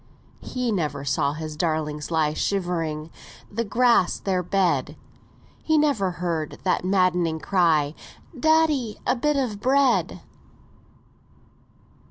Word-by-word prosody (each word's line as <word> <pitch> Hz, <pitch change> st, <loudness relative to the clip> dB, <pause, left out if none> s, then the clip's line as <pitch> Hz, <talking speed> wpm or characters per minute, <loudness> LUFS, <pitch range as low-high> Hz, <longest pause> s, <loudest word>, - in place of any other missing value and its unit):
He 250 Hz, -2 st, -3 dB
never 155 Hz, -7 st, -2 dB
saw 140 Hz, +1 st, 0 dB
his 155 Hz, 0 st, -6 dB
darlings 155 Hz, -2 st, -2 dB
lie 160 Hz, -2 st, +1 dB
Shivering, 165 Hz, -5 st, -2 dB, 0.4 s
the 230 Hz, +3 st, -1 dB
flags 235 Hz, -3 st, +2 dB
their 185 Hz, -2 st, -1 dB
bed; 170 Hz, -6 st, 0 dB, 0.6 s
He 315 Hz, -1 st, +2 dB
never 280 Hz, -11 st, +2 dB
heard 170 Hz, -3 st, -3 dB
that 185 Hz, -, +1 dB
maddening 180 Hz, -4 st, +1 dB
cry, 160 Hz, -6 st, +2 dB, 0.4 s
'Daddy, 300 Hz, -6 st, +2 dB
a -, -, +2 dB
bit 295 Hz, +4 st, 0 dB
of 235 Hz, -7 st, -2 dB
bread!'" 265 Hz, +2 st, +2 dB
180 Hz, 110 wpm, -24 LUFS, 155-235 Hz, 0.6 s, flags